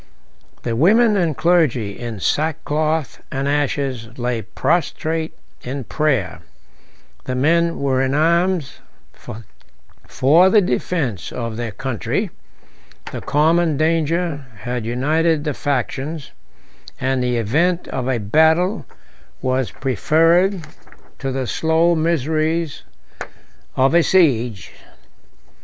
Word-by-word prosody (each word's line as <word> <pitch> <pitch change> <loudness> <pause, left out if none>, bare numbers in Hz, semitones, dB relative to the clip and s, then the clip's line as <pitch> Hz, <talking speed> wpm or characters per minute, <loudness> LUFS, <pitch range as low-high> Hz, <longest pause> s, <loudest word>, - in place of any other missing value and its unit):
The 115 -2 -2
women 210 - +4
and 170 -7 0
clergy, 135 - +1
in 115 -4 -6
sackcloth 155 - -1
and 135 +1 -2
ashes, 140 -5 -1
lay 120 -2 -2
prostrate 160 - -1 0.2
in 135 +2 -5
prayer: 130 - -1 0.9
the 130 - -3
men 170 +5 +2
were 135 -2 0
in 135 +1 0
arms 170 0 +1 0.3
for 140 - -1
the 210 - +5
defence 125 - -2
of 115 -2 -4
their 120 0 -3
country; 130 +1 -3 0.8
the - - -6
common 160 +1 +2
danger 160 -1 0
had 120 -1 -4
united 155 +6 +1
the 150 -2 -2
factions, 140 +3 -3 0.7
and 130 0 0
the 125 -1 0
event 165 - +1
of 130 -1 -3
a 130 -2 +1
battle 160 - +2 0.5
was 130 -3 -1
preferred 165 - +2 0.6
to 135 -1 -3
the 130 0 -2
slow 160 +5 +2
miseries 160 0 0 0.9
of 135 +3 +3
a 170 - +6
siege. 125 - +2
145 Hz, 105 wpm, -20 LUFS, 125-165 Hz, 0.9 s, a